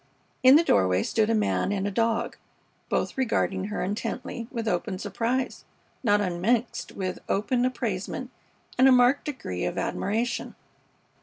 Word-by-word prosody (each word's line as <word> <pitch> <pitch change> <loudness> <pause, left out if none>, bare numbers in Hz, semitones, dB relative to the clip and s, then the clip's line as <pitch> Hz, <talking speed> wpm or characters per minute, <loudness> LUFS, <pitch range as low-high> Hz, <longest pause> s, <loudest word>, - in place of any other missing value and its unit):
In 260 +2 +8
the 320 - +6
doorway 95 - +3
stood 220 -1 +1
a 225 - +3
man 210 -2 +1
and 200 -1 -1
a - - -2
dog, 230 +2 0 0.5
both - - -1
regarding 195 -6 0
her 210 0 -3
intently 225 +4 -4
with 230 -3 -4
open 180 -1 -1
surprise, 230 +7 -2 0.4
not 205 -3 +4
unmixed 205 +6 -1
with 185 -1 -4
open 245 +5 +1
appraisement 245 0 -3 0.5
and 260 - +7
a - - +7
marked 250 +2 +4
degree 240 - -4
of - - -2
admiration. 225 +5 -2
225 Hz, 145 wpm, -26 LUFS, 195-250 Hz, 0.5 s, In